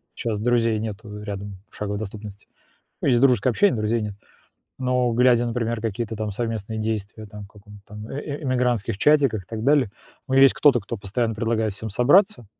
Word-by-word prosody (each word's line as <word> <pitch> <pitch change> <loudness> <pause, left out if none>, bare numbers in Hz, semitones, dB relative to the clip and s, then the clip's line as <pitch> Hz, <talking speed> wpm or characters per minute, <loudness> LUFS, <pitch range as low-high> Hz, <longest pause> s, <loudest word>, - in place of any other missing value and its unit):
щас 110 -3 -3
друзей 115 -1 +1
нету 105 -1 -7
рядом, 100 -1 -6
в - - -20
шаговой 105 -1 -3
доступности. 105 -1 -8 0.5
Ну, - - -3
есть 120 -3 +4
дружеское 125 -3 +4
общение, 190 - +2
друзей 110 +2 0
нет. 105 -2 -5 0.7
Но 125 -1 +1
глядя, 120 0 +4
например, 115 -1 -2
какие-то 115 0 -3
там 105 -1 -3
совместные 110 0 -4
действия, 110 0 -4
там, 105 -1 -10
в - - -16
каком-то 105 0 -16
там, 105 +1 -9
э 140 - -5
э 145 0 -6
эмигрантских 125 -6 0
чатиках 140 -9 +3
и - - -28
так 110 -1 -5
далее, 140 -3 +3 0.4
у 130 - -3
меня 135 +1 +7
есть 135 - +6
кто-то, 140 -5 +4
кто 110 +3 -6
постоянно 110 +4 -2
предлагает 110 -2 -1
всем 110 +2 -6
собраться. 145 - +3
110 Hz, 190 wpm, -23 LUFS, 105-125 Hz, 0.7 s, меня